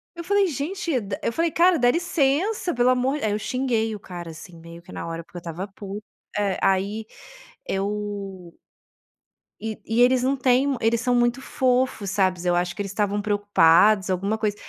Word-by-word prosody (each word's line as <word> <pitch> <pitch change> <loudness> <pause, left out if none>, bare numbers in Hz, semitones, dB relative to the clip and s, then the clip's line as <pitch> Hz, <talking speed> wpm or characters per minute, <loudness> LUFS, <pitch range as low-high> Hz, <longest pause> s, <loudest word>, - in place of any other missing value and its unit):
eu 340 - -6
falei: 400 +2 +2
"Gente, 320 -1 -2
dá". 195 -2 -5
Eu - - 0
falei: 330 +3 +1
"Cara, 350 +1 +4
dá 245 0 +4
licença, 345 - 0
pelo 245 0 +3
amor". 255 +3 +1
Aí 215 - +1
eu 210 - -1
xinguei 230 -2 -1
o 205 - -9
cara, 175 -3 -8
assim, 160 +2 -12
meio 170 +1 -12
que - - -15
na - - -6
hora, 165 0 -5
porque 175 - -13
eu - - -4
estava 170 +3 -6
pu 200 +1 -8 0.4
é, 200 -2 0
aí 200 +3 +1 0.6
eu 195 -3 -4 1.0
e 220 -1 -5
e 225 +2 +1
eles 250 0 +5
não 265 +2 +1
têm 260 +2 +2
eles 225 +1 +2
são 250 0 +1
muito 240 +2 +2
fofos, 255 -6 0
sabes, 185 -3 +1
eu 175 - +2
acho 175 0 -1
que - - -4
eles 195 -1 -4
estavam 205 0 0
preocupados, 205 -1 +4
alguma 195 +4 0
coisa. 210 -2 -1
215 Hz, 190 wpm, -24 LUFS, 195-255 Hz, 1.0 s, eles